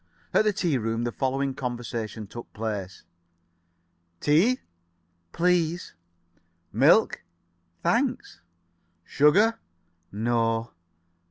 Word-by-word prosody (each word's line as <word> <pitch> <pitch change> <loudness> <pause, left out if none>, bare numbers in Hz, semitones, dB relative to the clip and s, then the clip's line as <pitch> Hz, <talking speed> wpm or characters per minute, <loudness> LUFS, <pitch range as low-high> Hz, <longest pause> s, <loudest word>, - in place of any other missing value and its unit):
At 215 - +4
the 210 - +4
tea 175 -9 0
room 115 +1 -2
the 120 - -1
following 135 +2 -1
conversation 120 -4 -5
took 120 +4 -10
place: 105 -4 -5 1.2
"Tea?" 180 +13 +3 0.7
"Please." 175 -1 0 0.8
[Pg - - -35
62]"Milk?" 160 +11 +5 0.6
"Thanks." - - 0 0.6
"Sugar?" 205 +11 +3 0.5
"No." 115 +1 0
130 Hz, 85 wpm, -26 LUFS, 115-170 Hz, 1.2 s, 62]"Milk